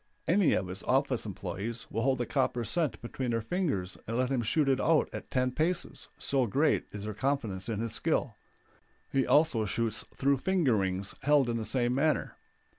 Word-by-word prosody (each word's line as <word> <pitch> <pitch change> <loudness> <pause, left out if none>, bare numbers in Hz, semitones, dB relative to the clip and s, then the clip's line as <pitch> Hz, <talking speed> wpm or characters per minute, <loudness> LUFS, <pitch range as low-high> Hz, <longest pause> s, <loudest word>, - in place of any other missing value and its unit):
Any 185 -1 +4
of - - +1
his 90 +2 -6
office 130 -3 +1
employes 100 +4 -5
will 115 - -1
hold 130 +1 +2
a - - 0
copper 130 -3 0
cent 130 +4 -1
between 125 +1 -3
their 115 -1 0
fingers 115 - -2
and 115 +2 -2
let 130 +1 +1
him 130 -3 +1
shoot 140 +6 +1
it 135 -1 +2
out 160 -2 +3
at - - -7
ten 130 -1 +1
paces, 170 +6 -2
so 135 -3 +1
great 140 +9 +2
is 105 -1 -7
their 110 0 -4
confidence 115 -6 -2
in 110 -3 -2
his 115 0 -3
skill; 150 -3 0 0.8
he 135 -1 +1
also 150 -7 +4
shoots 110 +1 -1
through 140 0 +2
finger 170 - +2
rings 95 0 -2
held 140 -2 +4
in 115 - 0
the 110 - -3
same 125 0 0
manner. 150 +4 +1
125 Hz, 190 wpm, -30 LUFS, 110-140 Hz, 0.8 s, Any